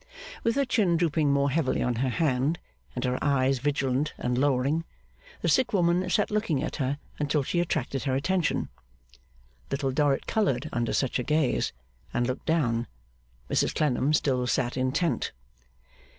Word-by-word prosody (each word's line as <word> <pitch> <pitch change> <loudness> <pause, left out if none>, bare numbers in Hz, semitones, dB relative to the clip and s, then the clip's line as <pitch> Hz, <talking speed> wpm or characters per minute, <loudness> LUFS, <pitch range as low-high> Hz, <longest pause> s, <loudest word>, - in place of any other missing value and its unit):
With 230 +1 +1
her 280 0 +2
chin 210 -9 +2
drooping 160 -3 +2
more 140 0 +2
heavily 145 -2 +1
on 125 -2 0
her 130 +2 +1
hand, 140 +3 +1 0.4
and 125 - -2
her 125 -1 -1
eyes 135 -2 +2
vigilant 140 +1 0
and 125 0 -1
lowering, 140 +4 +1 0.6
the - - -1
sick 255 -3 +3
woman 180 -1 +2
sat 205 +3 +1
looking 210 -9 0
at - - -4
her 140 -1 -1 0.2
until 145 0 +1
she 175 - -1
attracted 145 -5 -1
her 130 -2 +1
attention. 175 +5 0 1.0
Little 135 -1 -1
Dorrit 140 0 +1
coloured 155 - 0
under 120 -1 0
such 130 -1 0
a - - -1
gaze, 150 -1 +1 0.4
and 120 - +2
looked 130 +1 -4
down. 120 -8 +1 0.6
Mrs - - +1
Clennam 145 -1 +1
still 130 -4 +1
sat 125 -1 0
intent. 130 +7 0
140 Hz, 155 wpm, -27 LUFS, 130-165 Hz, 1.0 s, sick